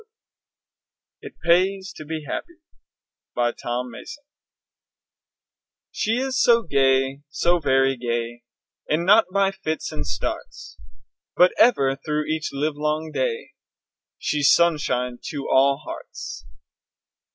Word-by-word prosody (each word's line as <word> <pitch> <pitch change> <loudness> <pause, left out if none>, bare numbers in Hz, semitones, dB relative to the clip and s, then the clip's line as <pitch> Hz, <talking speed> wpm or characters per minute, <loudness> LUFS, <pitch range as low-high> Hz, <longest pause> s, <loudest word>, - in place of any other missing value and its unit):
IT - - -10
PAYS 190 +2 +2
TO 155 - -9
BE 160 0 -5
HAPPY 345 - -5 0.8
BY 120 0 +1
TOM 120 +1 -4
MASSON 295 - -10 1.7
She 220 - -1
is 265 +1 0
so 235 -1 +5
gay, 135 -2 +2
so 175 +4 +1
very 135 -2 +2
gay, 120 0 -3 0.5
And 160 +3 +1
not 210 +4 +6
by 195 0 +2
fits 160 -4 -4
and 75 - -5
starts, 85 +1 -5 0.6
But 180 +1 +6
ever, 140 - +4
through 150 0 -1
each 155 0 -2
livelong 150 +2 -2
day 470 -2 -2 0.7
She's 145 -1 +2
sunshine 135 -7 +1
to 145 -2 -5
all 135 +1 +4
hearts. - - -8
150 Hz, 110 wpm, -23 LUFS, 135-185 Hz, 1.7 s, not